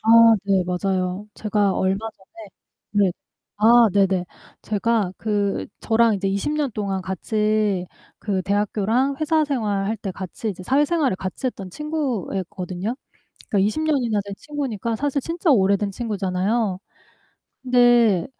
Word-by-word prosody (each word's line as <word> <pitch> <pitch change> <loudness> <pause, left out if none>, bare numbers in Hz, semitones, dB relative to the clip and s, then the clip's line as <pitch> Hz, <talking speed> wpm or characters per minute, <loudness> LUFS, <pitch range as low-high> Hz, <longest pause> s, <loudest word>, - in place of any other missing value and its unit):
아 - - -5 0.4
네. 195 -2 +2
맞아요. 185 +1 -2
제가 210 -2 +1
얼마 195 +4 0
전에 205 +1 -15 0.4
누랬 200 -4 +2 0.4
아 230 +2 +6
네네. 195 -2 +2 0.4
제가 215 -2 0
그 205 -2 -1
저랑 225 0 +3
이제 195 0 -2
20 200 +9 -1
년 300 -3 0
동안 200 -2 -2
같이 210 0 0 0.3
그 195 -3 -2
대학교랑 210 +7 0
회사 310 0 +2
생활할 215 -6 -1
때 195 -2 -4
같이 190 +4 -6
이제 190 -3 -5
사회생활을 290 - +2
같이 190 +7 -4
했던 195 -7 -5
친구였거든요. 210 - -3 0.5
그러니까 200 -4 +2
20 215 +9 -1
년이나 255 -9 +1
된 200 - -6
친구니까 240 -7 -3
사실 285 +2 -1
진짜 335 +3 -1
오래된 200 -4 +3
친구잖아요. 200 -1 -1 0.8
근데 240 -6 +4
210 Hz, 275 characters per minute, -22 LUFS, 195-240 Hz, 0.8 s, 아